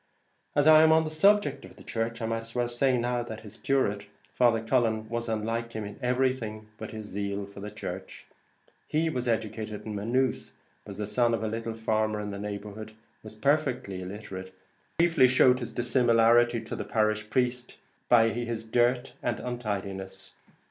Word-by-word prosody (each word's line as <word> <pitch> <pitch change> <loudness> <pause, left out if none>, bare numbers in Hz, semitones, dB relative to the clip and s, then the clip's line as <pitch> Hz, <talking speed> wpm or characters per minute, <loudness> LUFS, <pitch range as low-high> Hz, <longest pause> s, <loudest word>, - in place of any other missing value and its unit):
As 145 - +3
I 155 0 +8
am 160 0 +6
on 160 0 +5
the 155 - -4
subject 200 +6 +3
of - - -13
the - - -14
church, 115 0 -3
I - - 0
might 115 0 -1
as 115 +1 -9
well 120 -1 +1
say 125 +2 +1
now 120 0 0
that 110 -2 -7
his 105 -2 -11
curate, 105 -7 0 0.3
Father 120 -2 +4
Cullen, 115 -2 +1
was 115 0 -3
unlike 115 +2 -2
him 110 - -4
in 105 - -9
everything 125 -4 -1
but 110 - -6
his 110 -1 -7
zeal 100 0 -3
for 100 0 -12
the 105 +1 -6
church. - - -7 0.6
He 160 +1 +1
was 125 -3 -2
educated 110 -1 -2
at - - -17
Maynooth, 115 +4 -1 0.4
was - - -8
the 105 - -2
son 120 +1 +2
of 110 - -4
a - - 0
little 115 +1 -4
farmer 110 -1 0
in 105 0 -4
the 100 - -6
neighbourhood, 105 +1 -6 0.3
was 110 0 -11
perfectly 125 -7 0
illiterate, 95 -1 -8 0.4
but 170 - +4
chiefly 165 -6 +5
showed 125 0 +5
his 120 - -5
dissimilarity 120 -1 +3
to 110 - -6
the - - -4
parish 110 -1 0
priest 125 0 -1 0.3
by 115 -2 +6
his 115 -1 -4
dirt 120 +2 +1
and - - -1
untidiness. 100 -6 -5
115 Hz, 185 wpm, -28 LUFS, 110-125 Hz, 0.6 s, I